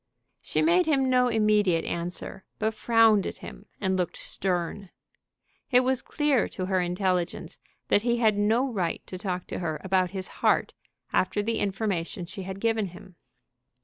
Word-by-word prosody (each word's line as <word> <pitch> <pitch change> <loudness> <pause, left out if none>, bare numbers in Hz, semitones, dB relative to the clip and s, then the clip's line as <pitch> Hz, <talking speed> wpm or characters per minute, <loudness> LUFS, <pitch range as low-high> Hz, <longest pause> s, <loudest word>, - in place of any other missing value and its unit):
She - - 0
made 345 +1 +4
him 270 -4 +2
no 250 0 +4
immediate 210 -7 +2
answer, 175 +2 -4
but 220 0 0
frowned 225 -2 +4
at - - -6
him 200 - -11
and 190 -2 0
looked 180 -2 -2
stern. 185 +1 -2 0.8
It 250 -1 +5
was 260 0 +1
clear 295 -5 +1
to 185 - -5
her 185 -1 +1
intelligence 180 0 -2 0.3
that 205 - +4
he 240 +1 +1
had 220 -3 +3
no 220 +6 +2
right 180 -5 -2
to 185 - -7
talk 180 -2 -3
to - - -4
her 160 -4 -3
about 190 -1 +2
his 190 -1 -5
heart - - +2 0.4
after 205 +2 +1
the 230 +1 -1
information 195 -3 -2
she 195 - -8
had 190 +1 -6
given 225 -1 +1
him. 180 +1 -13
200 Hz, 165 wpm, -27 LUFS, 185-225 Hz, 0.8 s, It